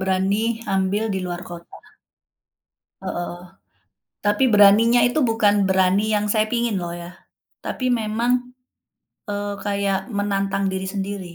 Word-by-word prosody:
berani 190 +3 0 0.3
ambil 195 +3 0
di 190 - -2
luar 175 0 -4
kota. 170 -1 -10 1.3
Heeh. 175 0 -4 0.9
Tapi 205 +6 +3
beraninya 210 +4 +6
itu 305 +5 0
bukan 210 -2 +3
berani 190 +2 +3
yang 210 0 0
saya 215 -1 +2
pingin 235 -3 0
loh 170 - -4
ya. 175 +1 -10 0.5
Tapi 255 - -4
memang, 225 +3 0 1.0
eee, 205 0 -3
kayak 200 -1 0
menantang 195 -1 -1
diri 190 0 -3
sendiri. 195 -3 -5
200 Hz, 120 wpm, -22 LUFS, 190-215 Hz, 1.3 s, beraninya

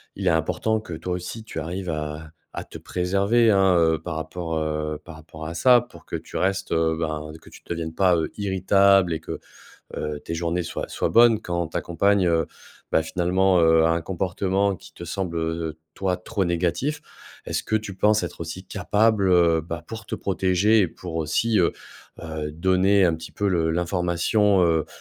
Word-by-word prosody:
il - - -3
est - - +6
important 90 +7 0
que 85 -6 -9
toi 85 +3 -4
aussi 90 +5 -5
tu 95 - -6
arrives 90 +4 -4
à 75 0 -4 0.2
à - - -5
te - - -10
préserver, 100 +6 +1
hein, 95 -2 +4
heu, 80 -1 +3
par 85 0 -6
rapport, 80 +1 -4
heu, 75 -1 -2
par 85 - -10
rapport 80 0 -10
à 85 - -5
ça 125 +4 +6
pour 85 -10 -15
que - - -5
tu - - -8
restes, 95 +1 -1
heu 80 0 +2
ben, 75 -1 -3
que - - -15
tu - - -15
deviennes 80 -1 -4
pas, 95 -2 +4
heu, 80 - -1
irritable 95 -2 +3
et 80 - -2
que, - - -6 0.6
heu, 75 -1 -3
tes 85 - -5
journées 85 +1 -1
soient - - -5
soient - - -1
bonnes. 115 -2 +6
Quand 85 -4 -2
ta - - -2
compagne, 100 +2 +2
heu, 80 -2 +2 0.5
bah, 80 - +4
finalement, 90 +2 +2
heu, 80 0 +5
a 80 - +3
un 85 +1 +1
comportement 95 +2 0
qui - - -15
te 85 - -8
semble, 85 -1 -3
heu, 80 0 -2
heu, 80 - -14 0.2
toi, 95 -2 -1
trop 95 +2 -2
négatif. 90 - -1 0.4
Est-ce - - -2
que 110 - +1
tu 105 -2 -5
penses 105 +1 +3
être 85 - -8
aussi 85 +3 -6
capable, 105 +2 +1
heu, 85 -2 +4
bah, 85 0 -6
pour 115 -1 -8
te - - -4
protéger 95 +3 +2
et 90 - +2
pour 85 0 -8
aussi, 90 +8 +1
heu, 85 - +3 0.5
heu, 80 -2 -5
donner 95 +4 +3
un 85 - +3
petit 80 0 -10
peu 100 -1 -1
le 85 -3 +1
l'information, 90 +3 +1
heu, 80 -2 +2
90 Hz, 200 wpm, -24 LUFS, 80-95 Hz, 0.6 s, est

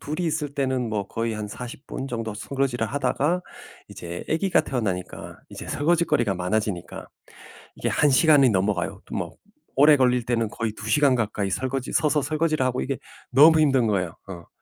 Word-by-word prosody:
둘이 155 +5 -4
있을 150 -2 -3
때는 130 -4 -1
뭐 105 -2 -3
거의 115 0 -2
한 105 -1 -5
40 125 +5 -9
분 135 - -5
정도 115 -4 -4
설거지를 125 0 -2
하다가 145 +6 0 0.5
이제 85 0 -7
아기가 170 +3 +2
태어나니까 105 -11 -4
이제 - - -9
설거짓거리가 145 - +1
많아지니까 90 0 -3 0.7
이게 - - -2
1 150 -1 +3
시간이 140 -2 +5
넘어가요. 95 -3 -1
또 - - -9
막 - - -4 0.5
오래 150 0 +8
걸릴 125 -2 +2
때는 115 -3 0
거의 110 0 -3
2 110 0 -8
시간 145 -2 +4
가까이 105 -4 -1
설거지 130 +4 -3
서서 150 -1 +2
설거지를 155 -2 0
하고 125 0 -1
이게 135 -2 -3 0.3
너무 155 +5 +7
힘든 135 -6 +3
거예요, 90 -5 -1
어. 85 -3 -9
125 Hz, 360 characters per minute, -24 LUFS, 110-145 Hz, 0.7 s, 오래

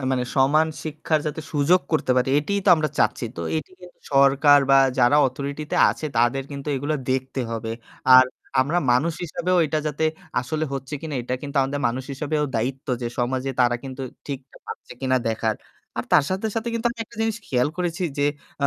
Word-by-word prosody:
মানে 125 -1 0
সমান 145 +4 +4 0.2
শিক্ষার 155 0 -1
যাতে 155 +1 -3
সুযোগ 155 +5 +3
করতে 155 -4 +1
পারি, 125 +1 +2
এটিই 200 +7 -1
তো - - +2
আমরা 155 -1 0
চাচ্ছি। - - +1
তো - - -4 0.2
এটি 155 - -5
কিন্তু 180 -1 -14
সরকার 140 +1 +6
বা 135 - +7 0.2
যারা 125 +3 +5
authority 140 +3 -4
তে - - 0
আছে 155 - -5
তাদের 120 +4 +2
কিন্তু 140 0 -7
এইগুলা 145 +3 -1
দেখতে 130 +1 -1
হবে। 115 0 -3 0.4
আর 130 0 +9 0.4
আমরা 155 +7 +1
মানুষ 150 +7 +2
হিসেবেও 180 +2 0
এটা 155 +1 -1
যাতে 150 +1 -1 0.4
আসলে 155 +5 -2
হচ্ছে 135 +1 -5
কিনা 155 -2 -5
এটা 125 +1 -2
কিন্তু 145 0 -6
আমাদের 140 +2 -2
মানুষ 125 +2 -4
হিসেবেও 150 +2 -1
দায়িত্ব 130 +4 -3 0.2
যে - - -1
সমাজে 130 +2 -1
তারা 120 -1 +3
কিন্তু 135 0 -6 0.2
ঠিকটা 135 -2 -7
পাচ্ছে - - -8
কিনা 130 -1 +1
দেখার। 110 0 0 0.4
আর - - -1
তার - - +6
সাথে, 190 +4 -1
সাথে 225 +1 -1
কিন্তু 230 +1 -1
আমি 235 - -10
একটা 235 - -18
জিনিস 225 -1 0
খেয়াল 125 +1 +1
করেছি 175 0 -2 0.2
যে, 145 - +3 0.4
আ - - +5
140 Hz, 195 wpm, -23 LUFS, 130-155 Hz, 0.4 s, আর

